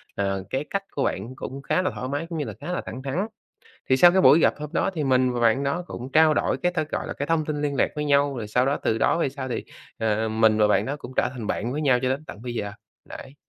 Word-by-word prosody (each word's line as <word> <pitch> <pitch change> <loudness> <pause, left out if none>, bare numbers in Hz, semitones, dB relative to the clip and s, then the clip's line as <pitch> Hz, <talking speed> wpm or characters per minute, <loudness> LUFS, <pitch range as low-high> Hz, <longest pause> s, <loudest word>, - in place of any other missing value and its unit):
ờ, 95 -1 -1
cái 135 +3 -2
cách 200 0 -2
của 140 - -2
bạn 115 +7 -3
cũng 135 +1 -7
khá 180 - +1
là 185 - -1
thoải 130 - -4
mái, 145 +4 -2
cũng 165 - -4
như 145 - -2
là - - -6
khá 170 +5 -5
là 180 - -2
thẳng 130 +3 -7
thắn. 135 +4 -3 0.7
Thì 130 - +6
sau 175 +5 +8
cái 190 - +4
buổi 155 -3 +7
gặp - - +4
hôm 150 0 -5
đó 185 - +1
thì 155 -3 -1
mình 130 -1 +3
và 120 - -2
bạn 115 +4 +3
đó 160 +6 -1
cũng 130 +2 -7
trao 155 -1 +5
đổi - - +1
cái 180 0 0
ta, 175 - 0
gọi - - -3
là, - - -4
cái 140 - -4
thông 165 -2 +1
tin 150 -1 -3
liên 140 -1 -1
lạc - - +3
với 150 0 -2
nhau, 140 -1 +2
rồi 110 -3 -4
sau 125 +4 +2
đó 140 - +1
từ 110 - +1
đó 165 - +2
về 145 - +1
sau 130 -1 -6
thì, 120 - -3 0.3
ờ, 110 0 0
mình 110 0 +3
và 105 - +5
bạn 105 - +2
đó 140 +2 -2
cũng 130 - -10
trở - - +2
thành 120 -5 -6
bạn 120 +4 -2
với 150 - -2
nhau 130 -4 +3
cho 130 - +1
đến 140 +4 -2
tận 105 -1 -10
bây 120 -1 -5
giờ, 100 -2 -3 0.3
đấy. 135 - -10
135 Hz, 305 wpm, -24 LUFS, 120-150 Hz, 0.7 s, sau